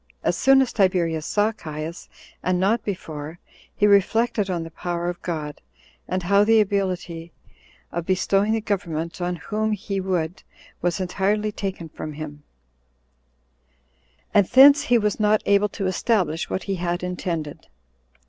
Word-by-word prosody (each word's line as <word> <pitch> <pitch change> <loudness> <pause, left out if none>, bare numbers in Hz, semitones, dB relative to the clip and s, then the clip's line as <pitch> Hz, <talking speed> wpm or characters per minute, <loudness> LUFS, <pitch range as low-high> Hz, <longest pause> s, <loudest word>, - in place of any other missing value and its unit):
As - - +1
soon 270 0 +5
as 250 - -5
Tiberius 175 -6 +1
saw 210 +1 +2
Caius, 160 -3 -7 0.3
and 180 -1 0
not 210 +5 +2
before, 160 -5 -6 0.4
he 205 - +2
reflected 210 +1 +3
on 175 -3 -1
the 165 - -9
power 175 +1 -3
of 175 - -6
God, 150 -4 -5 0.5
and 185 - -2
how 200 +3 +4
the 225 +1 +5
ability 185 -5 -1 0.6
of 170 -1 -4
bestowing 195 +3 +2
the 225 - 0
government 175 -5 -3
on 180 0 -1
whom 215 +4 -2
he 200 -1 -3
would 180 -2 -2 0.4
was 175 +1 0
entirely 205 +3 0
taken 190 -5 -5
from 155 0 -7
him; 150 -1 -8 1.9
and 200 -3 +5
thence 280 +3 +8
he 245 -4 +3
was 210 -2 0
not 215 0 +3
able 200 +1 +3
to 195 - -4
establish 185 -4 0
what 190 - -2
he 195 -2 -2
had 175 0 -2
intended. 170 -4 -4
185 Hz, 150 wpm, -23 LUFS, 170-210 Hz, 1.9 s, thence